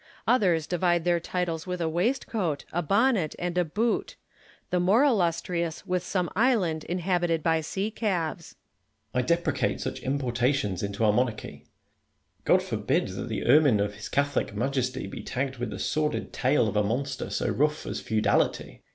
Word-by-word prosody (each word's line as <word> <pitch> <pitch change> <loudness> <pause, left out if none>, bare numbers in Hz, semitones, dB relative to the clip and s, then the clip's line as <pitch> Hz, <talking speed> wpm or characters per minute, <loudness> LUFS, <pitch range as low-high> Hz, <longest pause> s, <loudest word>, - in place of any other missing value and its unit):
Others 180 -10 +3
divide 175 -1 +1
their 175 -1 +3
titles 170 -2 -3
Avith 180 -1 -4
a 165 - 0
waistcoat, 175 - -1
a 175 - +1
bonnet, 200 - +2
and 175 0 -3
a 180 - +3
boot 215 +9 -1 0.3
\ - - -28
the 180 - +2
more 195 +9 +4
illustrious 170 - 0
with 180 0 0
some 180 0 -1
island 195 -9 +2
inhabited 175 -2 0
by 160 -1 +2
sea 195 +7 -3
calves. 175 -7 -2 0.6
Merino. 125 - +1
I - - -9
deprecate 170 +1 +1
such - - -4
importations 130 -5 0
into 100 +2 -1
our 105 - +4
mon 125 +4 +3
archy. 110 -3 -9 0.8
God - - +4
forbid - - 0
that - - -5
the - - -3
ermine 135 -3 +5
of 100 0 0
His 105 +1 -8
Catholic 140 -6 0
Majesty 130 +2 -1
be - - -7
tagged 130 +1 -3
with 120 -2 -3
the - - -6
sordid 150 -1 -1
tail 130 -2 +2
of 105 - -3
a 105 - +4
monster 130 +6 -2
so - - -1
rough 150 +2 0
as - - -4
feudality! 110 -1 +2 0.2
Lacy. - - -44
160 Hz, 175 wpm, -27 LUFS, 130-180 Hz, 0.8 s, ermine